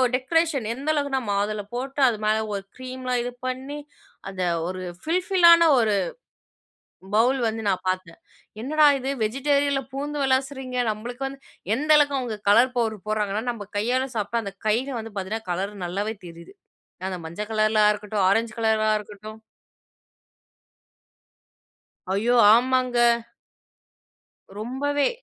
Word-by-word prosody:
Decoration! 285 -2 0
எந்த 275 +5 -5
அளவுக்குன்னா, 285 -3 0
மாதுள 205 +1 -1
போட்டு, 270 +3 -3
அது 225 -3 0
மேலே 215 +1 +2
ஒரு 195 - -4
கிரீம்லாம் 255 -1 -3
இது 245 - -4 0.2
பண்ணி, 265 +3 -5 0.5
அந்த 185 -1 -4 0.2
ஒரு 185 0 -5 0.2
ஃபில் 350 +3 0
ஃபில்லான 340 -3 +6
ஒரு 215 -3 +2 1.2
பவுல் 250 +5 +3
வந்து 225 0 -3
நான் 190 -1 -1
பார்த்தேன். 185 -3 -4 0.4
என்னடா 305 +4 +3
இது! 265 +1 -3
வெஜிடேரியனில 280 +4 +1
பூந்து 290 +2 -4
விளாசுறீங்க? 265 -1 -1
நம்மளுக்கு 240 +5 -6
வந்து 270 0 -9 0.4
எந்த 300 +4 -4
அளவுக்கு 285 -2 +3
அவங்க 235 -4 -4
கலர் 250 +5 +5
பவுடர் 220 -4 -1
போடுறாங்கன்னா, 210 0 -1
நம்ம 210 -4 -8
கையால 250 +5 0
சாப்பிட்டா 220 +2 -1
அந்த 200 - -6
கையிலயே 245 +4 0
வந்து 225 -1 -8
பார்த்திங்கன்னா, 200 +1 -4
கலர் 195 +4 -2
நல்லாவே 200 +5 -3
தெரியுது. 170 - -12 0.5
அந்த 185 -1 -4
மஞ்சள் 170 +6 -5
கலர்ல 215 0 +2
ஆ - - +6
இருக்கட்டும், 210 -1 -2
ஆரஞ்சு 225 +3 +1
கலரா 220 -1 +2
இருக்கட்டும். 210 +1 -11 2.7
ஐயோ, 230 +5 +1 0.2
ஆமாங்க! 255 0 +1 1.6
ரொம்பவே! 280 +5 0
235 Hz, 130 wpm, -24 LUFS, 210-270 Hz, 2.7 s, ஃபில்லான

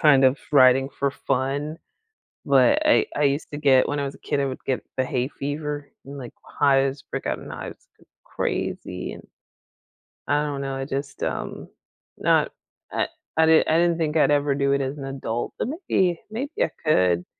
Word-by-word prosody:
kind 140 -5 +6
of 130 +1 +5 0.2
riding 135 -1 +6
for 140 0 -1
fun, 140 +4 -2 0.7
but 295 +1 +4
I 300 - +5
I 150 - +1
used 140 +1 +1
to 145 - -5
get 135 -3 +4
when 145 - -1
I 140 - -1
was 140 - -5
a - - -17
kid, 145 - -1
I 140 - +1
would 130 -1 -5
get 130 - -1
the 130 - +2
hay 125 -1 -1
fever 145 +1 -5
and, 140 +1 -8
like, 125 -3 -8
hives, 135 -1 +1
break - - -4
out - - -1
in - - -10
hives - - -8
c - - -23 0.2
crazy - - -3
and - - -12 1.0
I 145 +1 +2
don't 140 -2 -3
know, 135 -1 -3
I 135 0 -3
just, 140 +1 -5
um, - - -4 0.5
not - - +2 0.4
I - - 0 0.3
I 160 - +6
did 160 0 +5
I 160 - +3
didn't 170 0 +3
think 160 -2 -1
I'd - - +4
ever 145 -1 +2
do 140 0 +1
it 140 - +1
as 135 +2 -3
an 140 - -6
adult, 130 -4 -4
but - - -1
maybe 195 - 0
maybe 270 +7 -4
I - - +3 0.2
could. 90 - +3
140 Hz, 195 wpm, -24 LUFS, 135-150 Hz, 1.0 s, kind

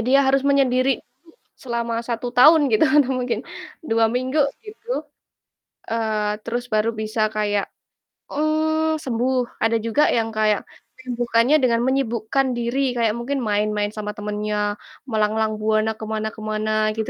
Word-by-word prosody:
dia 255 +5 +3
harus 270 0 +3
menyendiri 270 -2 +2
dulu - - -47 0.5
selama 235 -2 -3
1 235 +1 -3
tahun 295 +3 +7
gitu, 215 +7 +4
atau 295 -4 +4
mungkin, 240 -3 -2 0.4
2 225 -6 +2
minggu 255 +6 0 0.2
gitu, 440 -4 -5 0.8
eee, 215 -2 -1
terus 240 +2 -3
baru 215 -1 +1
bisa 215 0 0
kayak, 205 -2 -1 0.6
mmm, 315 +1 +1
sembuh. 250 0 -1
Ada 225 0 +2
juga 230 +7 +2
yang 225 -1 +1
kayak 215 -1 +1 0.4
menyembuhkannya 240 +1 +1
dengan 235 -2 +3
menyibukkan 260 0 0
diri, 245 +2 0
kayak 230 -3 +1
mungkin 265 +3 -2
main-main 210 0 0
sama 210 -1 -5
temannya, 210 0 -2 0.3
melanglang 215 0 0
buana 215 0 +1
ke 220 - -5
mana 220 0 -2
ke 220 - -12
mana, 215 0 -2 0.3
gitu 220 - -2
230 Hz, 140 wpm, -22 LUFS, 215-260 Hz, 0.8 s, tahun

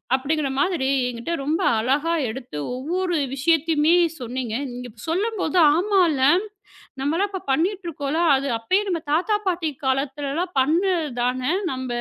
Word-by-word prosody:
அப்படிங்கிற 280 +1 -1
மாதிரி 305 -6 +1 0.2
என்கிட்ட 245 +7 -4
ரொம்ப 305 +4 0 0.2
அழகாக 285 +5 0
எடுத்து 245 - -7 0.2
ஒவ்வொரு 350 +7 -2 0.2
விஷயத்தையுமே 320 +2 +3 0.2
சொன்னீங்க. 245 -1 -4 0.2
நீங்கள் 245 0 -7
இப்போ - - -15
சொல்லும்போது. 380 -2 -1 0.2
ஆமா 390 +2 +2
இல்ல, 265 -2 0 0.8
நாமெல்லாம் 330 +9 0
இப்போ 380 - -5
பண்ணிட்டு 360 +6 0
இருக்கோம்ல! 310 +1 -2
அது 275 +1 -2
அப்படியே 375 - +1
நம் 330 -4 -3
தாத்தா, 395 +6 +2
பாட்டி 335 -3 -1 0.2
காலத்தில் 275 +1 -1
எல்லாம் 355 +2 -3
பண்ணதுதானே? 285 -5 0 0.2
நாம் 260 0 -4
305 Hz, 135 wpm, -23 LUFS, 265-350 Hz, 0.8 s, விஷயத்தையுமே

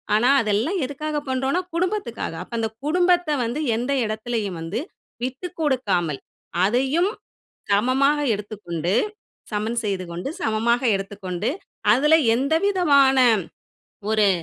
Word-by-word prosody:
ஆனா, 235 +4 +4
அதெல்லாம் 225 - 0
எதுக்காக 300 +3 -4
பண்றோம்னா 265 +7 0
குடும்பத்துக்காக. 355 - -2
அப்ப 210 - -15
அந்த 225 -1 0 0.2
குடும்பத்த 355 +2 +3 0.2
வந்து 240 +5 -2 0.2
எந்த 245 +4 -2
எடத்துலயும் 215 -3 -3
வந்து 170 +8 -3 0.4
விட்டுக்குடுக்காமல், 255 - -1 0.5
அதையும் 270 - +2 0.6
சமமாக 260 +8 +3 0.2
எடுத்துக்கொண்டு, 190 -5 -4 0.6
சமன் 220 +3 -1
செய்துகொண்டு, 185 0 -3
சமமாக 230 -1 +1
எடுத்துக்கொண்டு, 195 0 -3 0.4
அதுல 300 +6 +5 0.2
எந்தவிதமான 295 -3 +3 1.0
ஒரு 215 -2 +4
240 Hz, 95 wpm, -23 LUFS, 205-295 Hz, 1.0 s, அதுல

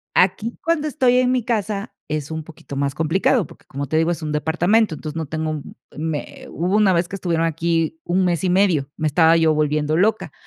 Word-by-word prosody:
Aquí, 195 +5 +2
cuando 330 -2 +1
estoy 250 -2 +3
en 255 0 +3
mi 255 -3 +1
casa, 215 -2 -2
es 150 -1 -3
un 160 0 -4
poquito 150 -2 -11
más 140 0 -1
complicado 165 - +1
porque, - - -18
como 140 +1 -5
te 155 - -1
digo, 165 +2 +2
es 170 -1 -3
un 150 - -3
departamento, 175 +7 +2
entonces 155 0 -7
no 160 - -3
tengo 155 +2 -3
un 155 -2 -6 0.2
me 155 -1 -5
hubo 180 +5 0
una 210 -3 +4
vez 170 0 +1
que 195 - -5
estuvieron 165 -3 0
aquí 165 0 -1
1 185 +2 +1
mes 175 -1 0
y 185 - +2
medio, 180 -7 +2
me 155 - -2
estaba 160 +2 +4
yo 160 -1 +3
volviendo 150 0 +1
loca, 190 -3 +1
165 Hz, 220 wpm, -21 LUFS, 155-195 Hz, 0.2 s, una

